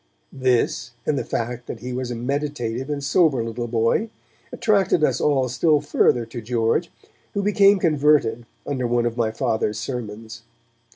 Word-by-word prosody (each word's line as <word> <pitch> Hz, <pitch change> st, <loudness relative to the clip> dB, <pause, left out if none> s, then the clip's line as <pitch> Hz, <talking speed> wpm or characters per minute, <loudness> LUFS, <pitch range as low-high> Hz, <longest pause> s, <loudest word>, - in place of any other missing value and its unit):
This, 125 Hz, -2 st, 0 dB
and 150 Hz, -, +1 dB
the -, -, -1 dB
fact 120 Hz, +1 st, -4 dB
that 110 Hz, -, -7 dB
he 125 Hz, +1 st, -5 dB
was 125 Hz, 0 st, -3 dB
a 120 Hz, -, -3 dB
meditative 130 Hz, -1 st, -3 dB
and 145 Hz, -1 st, -3 dB
sober 140 Hz, -4 st, +3 dB
little 115 Hz, +1 st, -4 dB
boy, 115 Hz, -, +1 dB, 0.4 s
attracted 195 Hz, -6 st, +2 dB
us 135 Hz, -4 st, +2 dB
all 135 Hz, -3 st, +2 dB
still 145 Hz, +5 st, +2 dB
further 125 Hz, -4 st, +2 dB
to 115 Hz, +1 st, -7 dB
George, 115 Hz, +8 st, 0 dB, 0.5 s
who 200 Hz, -, 0 dB
became 205 Hz, 0 st, +5 dB
converted 150 Hz, -8 st, +2 dB, 0.2 s
under 130 Hz, -4 st, -2 dB
one 120 Hz, 0 st, +1 dB
of 120 Hz, -1 st, -1 dB
my 115 Hz, -2 st, +1 dB
Father's 110 Hz, -1 st, -1 dB
sermons. 115 Hz, -1 st, -6 dB
125 Hz, 160 wpm, -22 LUFS, 115-150 Hz, 0.5 s, became